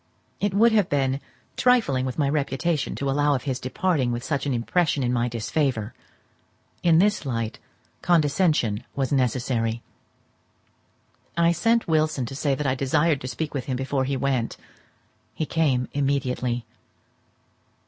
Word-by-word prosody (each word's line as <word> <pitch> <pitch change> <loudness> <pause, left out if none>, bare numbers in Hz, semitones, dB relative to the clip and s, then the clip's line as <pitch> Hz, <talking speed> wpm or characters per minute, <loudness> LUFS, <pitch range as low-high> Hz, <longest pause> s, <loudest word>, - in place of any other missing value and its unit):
It 205 -1 0
would 230 +3 +5
have 210 -5 +2
been 135 -1 0 0.4
trifling 220 - +3
with 130 - -5
my 145 -3 +2
reputation 145 +1 -1
to 140 - -3
allow 145 +1 +2
of 130 - -3
his 130 -3 -2
departing 130 0 0
with 120 0 -3
such 145 -1 -2
an - - 0
impression 145 +4 +1
in 125 0 0
my 120 0 +1
disfavour; 120 -1 -1 0.9
in 165 -2 +4
this 205 +2 +3
light, 115 -5 -3 0.4
condescension 150 - +2
was 135 0 -1
necessary. 120 -3 0 1.5
I 170 0 +4
sent 230 +7 +1
Wilson 155 -5 +1
to 135 - -7
say 140 0 0
that 150 - -4
I 130 - +2
desired 140 +3 +1
to 130 - -5
speak 150 +5 -4
with 135 -3 -3
him 130 -2 -2
before 135 0 -1
he 135 0 -1
went; 130 -3 -1 0.8
he 155 - -1
came 140 -6 +1
immediately. 130 -4 -1
140 Hz, 150 wpm, -24 LUFS, 125-155 Hz, 1.5 s, would